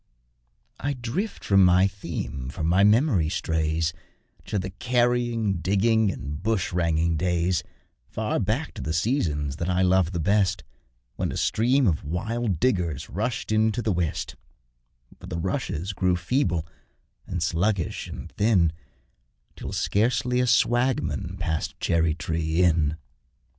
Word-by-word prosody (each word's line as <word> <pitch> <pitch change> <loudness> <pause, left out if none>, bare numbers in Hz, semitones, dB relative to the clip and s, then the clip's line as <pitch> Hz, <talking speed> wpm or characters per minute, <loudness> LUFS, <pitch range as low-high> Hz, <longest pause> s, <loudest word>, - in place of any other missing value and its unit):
I 145 +1 -1
drift 130 - -4
from 100 -1 +5
my 90 +1 +5
theme, 85 -9 -4
for 70 +4 -5
my 90 +5 +3
memory 105 - +4
strays 80 0 0 0.5
To - - -2
the 95 0 -3
carrying, 120 -1 +1
digging, 105 +4 +2
and 70 -1 -6
bushranging 85 -5 0
days 90 0 +1 0.5
Far 110 -1 -1
back 115 - -1
to - - -7
the 80 - -2
seasons 80 - 0
that 85 +3 -2
I 90 +1 +2
love 95 -2 +3
the 90 - -3
best, 100 +2 +1 0.5
When - - -1
a - - -4
stream 125 +5 +2
of 85 -8 +1
wild 100 +4 -2
diggers 85 - 0
rushed 110 +3 -2
into 110 +2 +2
the 110 - +1
west, 75 -7 -2 0.8
But - - -10
the 85 - -3
'rushes' 95 - -2
grew 95 -1 +1
feeble, 85 - 0 0.6
and 90 -2 -2
sluggish, 90 +1 -1
and - - -8
thin, 95 -7 +2 0.8
Till - - -7
scarcely 125 +3 +1
a 125 - +2
swagman 120 -6 +1
passed 80 -4 -3
Cherry 80 -2 +1
tree 80 0 0
Inn. 80 -3 +2
95 Hz, 135 wpm, -25 LUFS, 80-110 Hz, 0.8 s, from